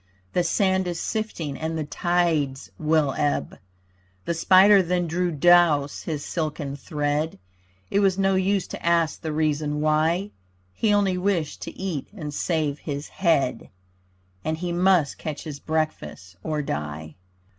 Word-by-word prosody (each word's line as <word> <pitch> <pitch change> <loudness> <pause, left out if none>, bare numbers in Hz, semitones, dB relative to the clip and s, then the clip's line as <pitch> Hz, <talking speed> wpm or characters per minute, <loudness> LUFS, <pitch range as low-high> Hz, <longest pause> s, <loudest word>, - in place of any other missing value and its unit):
The 180 - +2
sand 190 +2 +1
is 175 -2 -3
sifting 175 -10 -3
and 160 +1 -3
the 155 - -1
tides 160 -4 0
will 155 -3 +2
ebb. 145 -1 -1 0.7
The 170 - 0
spider 190 +4 +6
then 175 0 0
drew 175 +2 0
dose 160 -2 +4
his 150 -3 -4
silken 150 -4 -3
thread, 150 - -2 0.5
It 200 - +3
was 195 -2 +3
no 195 0 +2
use 190 0 +1
to - - -7
ask 170 -1 +1
the 160 - -3
reason 150 -1 0
why. 160 +6 +1 0.4
He 215 - +1
only 195 -3 +2
wished 180 -5 -1
to - - -7
eat 180 -8 -3
and 150 -7 -6
save 150 -2 -1
his 145 -1 -5
head, 160 -10 0 0.7
And 160 0 -1
he 175 +1 -3
must 175 -4 +2
catch 155 -2 -5
his 150 -3 -7
breakfast, 155 - -3
or 155 -2 -2
die. 75 - -5
160 Hz, 145 wpm, -24 LUFS, 150-180 Hz, 0.7 s, spider